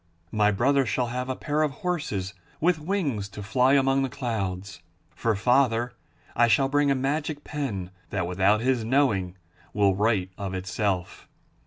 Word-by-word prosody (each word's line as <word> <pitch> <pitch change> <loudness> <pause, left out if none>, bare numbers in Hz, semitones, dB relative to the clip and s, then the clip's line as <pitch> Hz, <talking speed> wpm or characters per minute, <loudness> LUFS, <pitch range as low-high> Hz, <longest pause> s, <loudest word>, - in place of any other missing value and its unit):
My 105 -1 +3
brother 135 +7 +3
shall 120 +1 -1
have 125 +1 -3
a 130 - -1
pair 150 +3 -1
of 155 - +2 0.2
horses 105 - -2 0.3
with 170 0 +2
wings 150 - -2
to 105 +1 -8
fly 125 +6 +3
among 135 -1 +3
the 135 - 0
clouds. 100 -7 -4 0.3
For 115 -2 0
father 120 +1 +2 0.4
I 120 - +5
shall 135 +4 +3
bring 145 0 +2
a 140 - +3
magic 145 +3 -2
pen 105 - -4 0.2
that, 95 -3 -1
without 95 +4 +2
his 125 -1 +1
knowing, 110 -8 +1 0.4
will 100 -2 +4
write 100 -3 +1
of 95 -2 -4
itself. 95 0 -2
120 Hz, 160 wpm, -26 LUFS, 100-135 Hz, 0.4 s, I